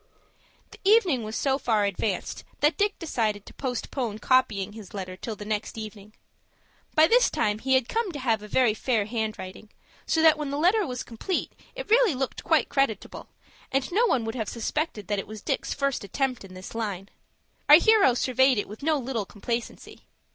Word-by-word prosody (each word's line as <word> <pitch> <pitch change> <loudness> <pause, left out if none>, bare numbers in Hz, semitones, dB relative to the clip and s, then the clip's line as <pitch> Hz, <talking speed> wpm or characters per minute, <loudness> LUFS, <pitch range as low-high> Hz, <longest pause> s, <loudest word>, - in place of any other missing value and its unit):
The - - -14
evening 390 - +4
was 215 0 -5
so 270 +2 +1
far 220 -6 +1
advanced 200 0 -2 0.2
that 295 +2 +3
Dick 410 -1 0
decided 220 - -2
to - - -13
postpone 245 -3 -3
copying 215 -5 +1
his 210 -2 -11
letter 185 -2 -5
till 220 +4 -6
the 210 - -9
next 215 +1 -3
evening. 215 -1 -9 0.8
By 310 0 +7
this - - +4
time 210 0 0
he 265 +3 +2
had 260 -2 +2
come 455 -4 -1
to - - -5
have 230 -5 0
a 210 - -9
very 240 0 +3
fair 220 -1 0
handwriting, 215 -3 -5 0.4
so 320 - +2
that 315 -1 +6
when 295 -2 -3
the 285 - -2
letter 370 +5 +3
was 250 -1 -4
complete 245 - -3 0.2
it - - -7
really 455 - +5
looked 265 +1 -3
quite - - +2
creditable, 270 -8 -2 0.4
and 270 +3 0
no 455 +7 +3
one 240 - +1
would 225 - -3
have 220 -5 -3
suspected 235 - -3
that 205 -1 0
it - - -6
was 215 -1 -9
Dick's - - -2
first 275 -4 -1
attempt 255 +5 -2
in 185 -1 -12
this 185 0 -9
line. 200 -4 -4 0.6
Our 295 - +12
hero 390 - +5
surveyed 260 0 +3
it 205 - -1
with 210 +2 -10
no 310 +1 +2
little 245 -5 -3
complacency. 230 +3 -6
240 Hz, 190 wpm, -26 LUFS, 210-290 Hz, 0.8 s, Our